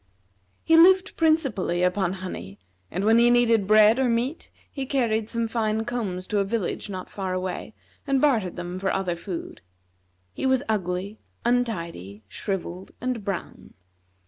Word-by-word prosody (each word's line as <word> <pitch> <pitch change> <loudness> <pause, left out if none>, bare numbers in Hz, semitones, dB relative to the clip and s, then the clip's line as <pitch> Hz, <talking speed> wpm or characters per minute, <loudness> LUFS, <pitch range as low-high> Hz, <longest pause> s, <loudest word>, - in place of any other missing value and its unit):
He 325 - +4
lived 370 +3 +6
principally 275 - +1
upon 180 0 +1
honey; 140 - -7 0.3
and 185 +3 -2
when 225 +2 +5
he 240 0 +5
needed 230 -4 +3
bread 215 +3 +6
or 260 -2 +2
meat, 240 +7 -1 0.2
he 270 -2 -5
carried 225 -5 0
some 230 -1 -1
fine 220 -1 -1
combs 195 -7 -3
to 210 - 0
a - - +3
village 205 0 -3
not 185 -2 -6
far 190 -2 -4
away 185 +3 -4 0.3
and 275 -1 +2
bartered 230 -11 +2
them 175 +1 -5
for 190 0 0
other 185 -3 -1
food. 175 0 -7 0.7
He - - -2
was 260 0 +2
ugly, 195 0 -2 0.3
untidy, 170 - -2
shrivelled, 185 - -5
and 250 -3 -3
brown. 195 -3 -6
215 Hz, 150 wpm, -25 LUFS, 185-240 Hz, 0.7 s, lived